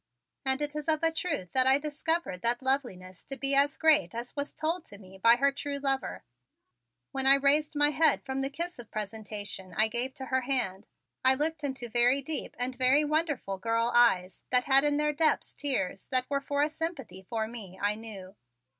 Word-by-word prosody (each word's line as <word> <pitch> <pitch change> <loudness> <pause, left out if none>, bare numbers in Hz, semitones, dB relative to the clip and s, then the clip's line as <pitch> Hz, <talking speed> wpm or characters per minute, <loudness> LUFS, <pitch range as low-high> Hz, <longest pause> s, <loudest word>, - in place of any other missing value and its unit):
And 265 +2 0
it 295 0 -4
is 300 0 -5
of 315 +1 +1
a 325 - +3
truth 320 - -3
that 260 0 +2
I 265 +1 +5
discovered 300 - -3
that 240 +2 +1
loveliness 220 -10 -2
to 275 - -6
be 275 0 +3
as 280 +2 +3
great 310 -6 +3
as 240 +1 -6
was 285 0 -3
told 325 +2 -2
to 200 - -11
me 190 -1 -15
by 230 +4 +6
her 280 +3 +2
true 280 +1 -4
lover. 270 -1 -2 0.9
When 270 0 0
I 275 - +8
raised 290 +2 +2
my 290 0 +4
head 315 -1 +2
from 265 0 -3
the 270 - -2
kiss 340 +2 -5
of 235 - -9
presentation 205 -3 -6
I 220 +1 +4
gave 245 +3 -1
to 265 - -6
her 260 0 0
hand 245 -8 +1 0.4
I 260 0 +6
looked 310 +2 -2
into 265 -3 -4
very 245 +4 +3
deep 310 +3 -3
and 250 +1 -1
very 260 +4 +4
wonderful 290 - -1
girl 230 +3 0
eyes 190 -7 +3
that 250 -1 +3
had 270 0 +5
in 290 -1 +1
their 300 0 0
depths 310 +1 0
tears 225 -10 -2
that 255 -1 0
were 280 0 0
for 285 +1 -1
a 300 - 0
sympathy 305 - -6
for 220 +3 -4
me, 210 -5 -7
I 205 +1 +1
knew. 210 -3 -9
265 Hz, 205 wpm, -28 LUFS, 225-290 Hz, 0.9 s, I